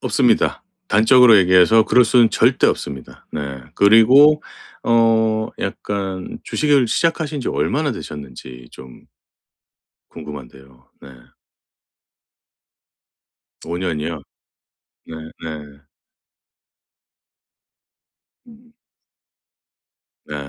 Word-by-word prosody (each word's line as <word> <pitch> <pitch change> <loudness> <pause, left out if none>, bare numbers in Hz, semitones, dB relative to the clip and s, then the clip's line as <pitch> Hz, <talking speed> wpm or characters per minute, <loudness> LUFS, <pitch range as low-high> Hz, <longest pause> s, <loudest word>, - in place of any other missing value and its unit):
없습니다. 125 -5 0 0.2
단적으로 115 0 +5
얘기해서 90 +4 +4
그럴 125 +2 +3
수는 120 0 +3
절대 - - +2
없습니다. 70 -3 -5
네. 70 -3 -6
그리고 130 +9 +5 0.4
어 110 -1 +1
약간 95 -2 -6
주식을 145 -4 +1
시작하신 155 +3 -2
지 125 - -4
얼마나 145 0 -2
되셨는지 65 - -11
좀 65 -1 -15 1.1
궁금한데요. 65 -4 -13
네. - - -14 2.6
5년이요? 85 -2 -5 0.8
네네. 80 -2 -11 2.7
음. 235 0 -20 1.5
네. 75 - -8
100 Hz, 170 characters per minute, -18 LUFS, 75-125 Hz, 2.7 s, 단적으로